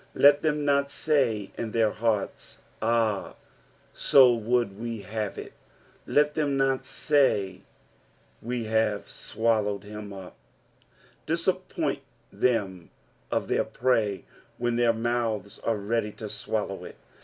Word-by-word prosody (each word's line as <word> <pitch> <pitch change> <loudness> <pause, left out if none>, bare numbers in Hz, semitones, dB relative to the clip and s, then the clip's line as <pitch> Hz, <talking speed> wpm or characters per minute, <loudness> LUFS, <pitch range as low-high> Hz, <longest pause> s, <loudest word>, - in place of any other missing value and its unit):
Let 145 0 +6
than 150 -1 0
not 140 0 +2
tay 125 -11 0
in 115 -2 -3
their 110 -2 +3
heart*. 110 -3 -2 0.2
Ah, 115 -3 +1 0.7
to - - +4 0.2
wruld 115 -2 0
ue 115 -3 -4
hat« 105 +1 -4
it: - - -8 0.5
let 150 0 +3
them 145 -3 0
not 135 -1 0 0.2
lay. 100 -10 +3 0.8
We 120 +1 -3
hare 110 -1 +1
tKoHaaed 105 -1 -1
Mm 105 0 -8
vp." 95 -2 -9 0.9
Cissppoint - - -1 0.3
them 100 -8 0 0.4
of - - -1
their - - +2
prey 110 -6 0 0.3
when 120 0 0
their 120 -1 +4
mouths 115 -3 -2
are 115 -2 0
ready 105 +1 -1
to - - -7
swallow - - -3
it. - - -9
115 Hz, 120 wpm, -27 LUFS, 105-125 Hz, 0.9 s, Let